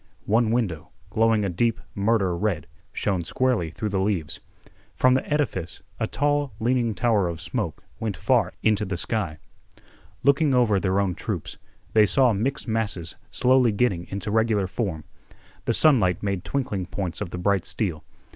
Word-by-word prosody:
One 110 +2 +3
window, 105 -10 -1 0.2
glowing 110 -1 +3
a - - +1
deep 115 +6 +1
murder 100 -3 +1
red, 90 -4 -1 0.3
shone 95 -4 -1
squarely 120 -2 0
through 105 +6 -4
the 95 -1 0
leaves. 95 -6 -1 0.6
From 130 0 +4
the 130 - +2
edifice 110 - -1 0.2
a - - 0
tall 145 -1 0
leaning 120 -1 +1
tower 110 -5 +2
of 85 -2 -4
smoke 85 0 -3 0.2
went 110 -4 -3
far - - +2
into 110 -1 +3
the 95 -3 -3
sky. 90 -5 -2 0.9
Looking 140 0 +4
over 110 -5 +3
their 95 +1 +1
own 100 -3 +1
troops, - - -5 0.3
they 110 -1 +6
saw 130 +1 +4
mixed 120 +8 -2
masses 105 -7 -2
slowly 125 +1 +3
getting 100 -5 0
into 100 +2 -4
regular 110 -2 +2
form. 95 -4 -3 0.6
The 115 - +1
sunlight 105 - +4
made 100 -3 -1
twinkling 105 -10 -2
points 95 0 -4
of 100 - -3
the 90 - -6
bright 95 +1 +1
steel. 85 -8 -2
105 Hz, 160 wpm, -25 LUFS, 95-120 Hz, 0.9 s, they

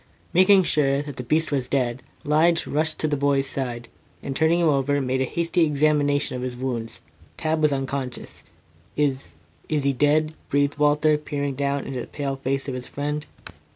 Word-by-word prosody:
Making 185 +2 +6
sure 140 -3 +1
that 145 -3 -8
the 125 - -4
beast 155 +6 0
was 135 -3 -1
dead, 125 -2 -1 0.2
Lige 165 +3 +3
rushed 155 +1 0
to 155 - 0
the 150 - 0
boy's 140 -1 +1
side, 120 -3 -4 0.4
and 135 - -4
turning 160 +3 +3
him 170 - +3
over, 145 -1 +2
made 130 -1 -1
a - - +2
hasty 170 +4 +1
examination 145 -2 +2
of 125 - -4
his 125 -1 -4
wounds. 120 -3 -4 0.4
Tad 155 0 -1
was 150 -1 +4
unconscious. 135 -2 -4 0.5
"Is 140 -2 -1 0.4
is 150 -2 0
he 140 0 +2
dead?" 150 +3 +2 0.2
breathed 145 +1 +1
Walter, 150 +1 +3
peering 145 -2 -3
down 140 +1 -1
into 130 -2 -4
the - - -8
pale 140 -2 -3
face 135 +1 -2
of 135 - -3
his 125 0 -6
friend. 150 +1 -4
145 Hz, 185 wpm, -24 LUFS, 135-150 Hz, 0.5 s, Making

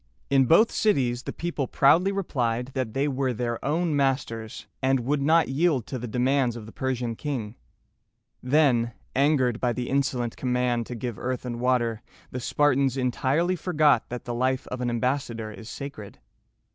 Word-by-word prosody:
In 135 -1 +5
both 190 - +5
cities 125 - +1
the - - -5
people 165 -6 -3
proudly 165 +11 +4
replied 125 -10 -1
that 130 -5 -3
they 140 +2 +1
were 135 -2 -1
their 120 0 -3
own 160 +2 0
masters, 130 -5 -1 0.2
and 130 -1 +2
would 140 +4 0
not 160 +4 +4
yield 140 -3 +1
to 130 - -5
the 120 - -5
demands 125 +1 +1
of 115 -3 -8
the 110 - -11
Persian 125 -3 -2
king. 120 -7 -4 0.9
Then, 125 -4 +2 0.2
angered 130 -4 +2
by 125 -1 +1
the 125 +1 -4
insolent 130 -4 0
command 125 -2 0
to 125 - -6
give 120 -2 -5
earth 130 0 -3
and 120 -1 -4
water, 120 -3 +1 0.3
the 125 - -4
Spartans 135 0 +2
entirely 135 +7 +1
forgot 155 -8 +2
that 125 0 -6
the 120 - -3
life 130 +2 0
of 125 0 -5
an 125 - 0
ambassador 120 -2 -2
is 110 +1 -10
sacred. 140 - -8
130 Hz, 170 wpm, -26 LUFS, 120-140 Hz, 0.9 s, In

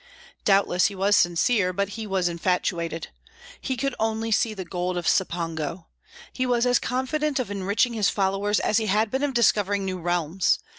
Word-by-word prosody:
Doubtless 195 -3 +3
he 200 - -6
was 200 +2 +2
sincere, 180 +3 +2
but 200 +2 -1
he 220 +1 -6
was 190 -3 0
infatuated. 170 -1 -2 0.5
He 260 -2 -3
could 275 +1 -1
only 225 0 -1
see 215 0 +1
the 190 -2 -6
gold 180 +1 -3
of 175 - -3
Cipango. 165 -2 -1 0.5
He 255 -1 -1
was 240 -1 +2
as 245 0 +3
confident 275 +4 -1
of 245 -6 -2
enriching 205 +5 0
his 215 -3 +2
followers 200 +1 0
as 215 - +1
he 220 -1 0
had 210 +2 +1
been 265 - -1
of 285 -3 -1
discovering 205 -4 +2
new 185 -1 -3
realms. 175 +1 +1
200 Hz, 180 wpm, -25 LUFS, 180-225 Hz, 0.5 s, Doubtless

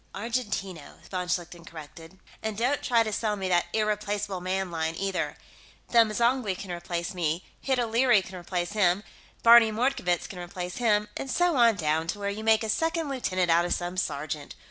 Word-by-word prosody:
"Argentino," 205 - -4 0.2
von 180 -1 -3
Schlichten 175 -1 -3
corrected. 165 +2 -11 0.2
"And 220 -2 -3
don't 255 +5 +1
try 235 -2 +3
to 215 -1 -4
sell 210 0 0
me 190 -2 -3
that 175 -1 +2
Irreplaceable 210 -3 -1
Man 185 0 -2
line, 160 -1 -2
either. 195 +1 -2 0.5
Them 230 -2 +5
M'zangwe 235 -3 +1
can 190 -1 -7
replace 170 0 -4
me, 170 -1 -1
Hid 265 -2 0
O'Leary 235 -2 +3
can 185 - -10
replace 175 0 -3
him, 200 -2 +2 0.4
Barney 230 -1 +8
Mordkovitz 215 -7 0
can 185 - -9
replace 180 0 -6
him, 210 -3 +2
and 270 - -5
so 350 +2 +2
on 235 -3 +5
down 160 -2 0
to 195 - -2
where 200 0 -2
you 215 +2 -6
make 220 0 +4
a 220 - -3
second 325 +5 0
lieutenant 185 -10 0
out 170 +1 +4
of 175 - 0
some 175 +1 -4
sergeant. 150 -4 -3
195 Hz, 185 wpm, -27 LUFS, 175-230 Hz, 0.5 s, Barney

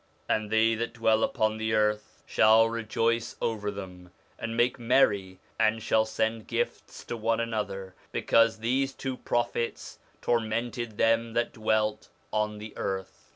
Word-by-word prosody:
'And 110 -1 0
they 110 +1 +4
that 115 +1 -3
dwell 110 -1 +3
upon 110 0 +1
the 110 0 0
earth 105 0 0
shall 110 +1 +5
rejoice 115 0 -1
over 105 -2 -1
them, 90 -3 -8 0.3
and 115 0 -4
make 120 +1 +2
merry, 105 -7 +2 0.2
and 110 0 +2
shall 110 -1 +3
send 110 0 -2
gifts - - -3
to - - -5
one 115 0 0
another, 105 -5 -3 0.2
because 115 -1 +3
these 135 +4 +1
two 130 -1 -4
prophets 120 -1 -2 0.2
tormented 115 -1 -1
them 115 0 +2
that 120 0 0
dwelt 110 -1 0 0.2
on 105 0 0
the 105 0 -9
earth.' 95 -1 -5
110 Hz, 145 wpm, -28 LUFS, 105-115 Hz, 0.3 s, shall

